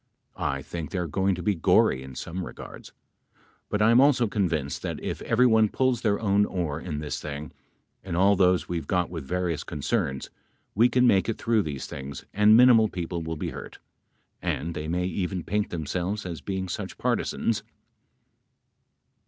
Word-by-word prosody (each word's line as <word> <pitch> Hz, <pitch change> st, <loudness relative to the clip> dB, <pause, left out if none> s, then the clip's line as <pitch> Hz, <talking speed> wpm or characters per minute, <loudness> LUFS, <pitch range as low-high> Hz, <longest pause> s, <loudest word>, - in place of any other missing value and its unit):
I 70 Hz, 0 st, -2 dB
think 80 Hz, 0 st, -6 dB
they -, -, -4 dB
are 90 Hz, -, -1 dB
going 95 Hz, +4 st, 0 dB
to 90 Hz, -, -6 dB
be 105 Hz, -, +2 dB
gory 80 Hz, -6 st, +3 dB
in 65 Hz, -1 st, -10 dB
some 90 Hz, +7 st, -5 dB
regards, -, -, -10 dB, 0.8 s
but 105 Hz, 0 st, +1 dB
I 115 Hz, -, +5 dB
am 120 Hz, +2 st, +6 dB
also 135 Hz, -4 st, +4 dB
convinced 85 Hz, -9 st, -1 dB
that -, -, -4 dB
if -, -, -4 dB
every 120 Hz, +2 st, +3 dB
one 110 Hz, -3 st, +4 dB
pulls 130 Hz, 0 st, +1 dB
their 105 Hz, -3 st, +1 dB
own 100 Hz, -1 st, +3 dB
oar 80 Hz, -7 st, -3 dB
in 80 Hz, -5 st, -4 dB
this 75 Hz, 0 st, -4 dB
thing, 75 Hz, 0 st, -6 dB, 0.5 s
in 95 Hz, -3 st, -4 dB
all 100 Hz, +3 st, +4 dB
those 90 Hz, -1 st, +3 dB
we've 85 Hz, -2 st, -4 dB
got 90 Hz, -3 st, 0 dB
with 80 Hz, -5 st, -5 dB
various 90 Hz, 0 st, -2 dB
concerns, 75 Hz, -, -2 dB, 0.4 s
we 115 Hz, +4 st, +4 dB
can 125 Hz, +1 st, +3 dB
make 100 Hz, -3 st, +3 dB
it 115 Hz, -, -1 dB
through 115 Hz, -2 st, +2 dB
these 75 Hz, -7 st, -5 dB
things 70 Hz, 0 st, -8 dB
and 105 Hz, +2 st, +6 dB
minimal 120 Hz, -3 st, +6 dB
people 85 Hz, -1 st, -4 dB
will 80 Hz, 0 st, -4 dB
be -, -, -3 dB
hurt. -, -, -9 dB, 0.6 s
And 85 Hz, +3 st, -2 dB
they 75 Hz, -1 st, -5 dB
may 90 Hz, +2 st, -1 dB
even 90 Hz, 0 st, -2 dB
paint 105 Hz, +3 st, -1 dB
themselves 90 Hz, +5 st, -3 dB
as 85 Hz, -5 st, -5 dB
being 95 Hz, +5 st, -3 dB
such 90 Hz, -, -5 dB
partisans. 110 Hz, -2 st, 0 dB
90 Hz, 180 wpm, -26 LUFS, 80-105 Hz, 0.8 s, am